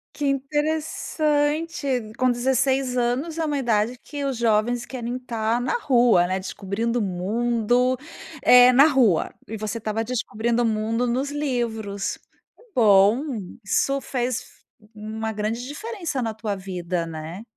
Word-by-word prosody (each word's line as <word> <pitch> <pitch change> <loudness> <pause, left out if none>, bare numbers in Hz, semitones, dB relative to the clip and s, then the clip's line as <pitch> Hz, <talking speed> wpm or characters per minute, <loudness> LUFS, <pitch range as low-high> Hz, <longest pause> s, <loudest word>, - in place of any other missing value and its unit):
Que 295 - -3
interessante. 295 -2 -1
Com 255 0 +3
16 260 +1 +1
anos 255 +7 -1
é 325 - 0
uma 295 -2 -1
idade 235 -2 +1
que 285 -1 -5
os 270 -3 -2
jovens 235 +1 +1
querem 245 -2 -5
estar 235 -2 -1
na 260 - 0
rua, 240 - +4
né, 185 +1 -1
descobrindo 205 +5 -2
o - - 0
mundo, 235 +6 +1 0.5
eh, 250 0 +8
na 275 +4 +7
rua, 245 - +2
e 220 - -5
você 215 +1 -4
estava 220 0 -2
descobrindo 235 0 -1
o - - +2
mundo 225 +2 0
nos 260 +4 -1
livros. 235 -8 -2 0.4
Que - - -21
bom! 210 +2 +5 0.4
Isso 275 +7 +1
fez 250 -2 -2 0.5
uma 220 +1 -5
grande 220 +3 -3
diferença 335 - -4
na 225 -2 -2
tua 215 -2 -3
vida, 180 -2 -3
né? 165 +4 -7
240 Hz, 140 wpm, -24 LUFS, 215-270 Hz, 0.5 s, eh